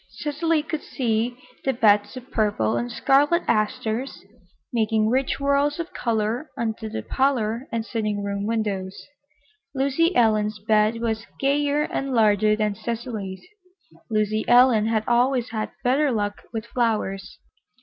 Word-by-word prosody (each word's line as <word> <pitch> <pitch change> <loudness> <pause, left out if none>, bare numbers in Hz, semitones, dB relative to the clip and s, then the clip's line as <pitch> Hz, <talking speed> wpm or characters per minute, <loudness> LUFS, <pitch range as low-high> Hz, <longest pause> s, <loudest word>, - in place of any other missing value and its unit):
Cecily 310 +1 -1
could 315 -1 -4
see 235 -1 -1 0.3
the 270 - +1
beds 210 0 +3
of 255 +1 -11
purple 205 - +1
and 120 0 -2
scarlet 290 +6 +3
asters, 230 +2 -1 0.5
making 220 -1 +2
rich 260 +3 +1
whorls 280 +1 +1
of 335 +1 -5
color 230 +5 -1
under 220 -1 -3
the 220 - -5
parlor 255 -2 0
and 230 -1 -2
sitting 215 -3 -2
room 200 0 -3
windows. 200 -4 -2 0.8
Lucy 280 +6 +1
Ellen's 215 -2 +2
bed 215 +2 +1
was 225 0 -2
gayer 285 +1 +1
and 275 -3 -3
larger 215 -1 +4
than 215 -1 0
Cecily's. 220 -4 -5 0.6
Lucy 215 0 0
Ellen 240 -3 +5
had 220 -1 +1
always 245 0 +2
had 215 -1 -3
better 270 +3 +2
luck 205 -3 -2
with 225 -1 -4
flowers. 220 -5 -2
230 Hz, 135 wpm, -24 LUFS, 215-265 Hz, 0.8 s, Ellen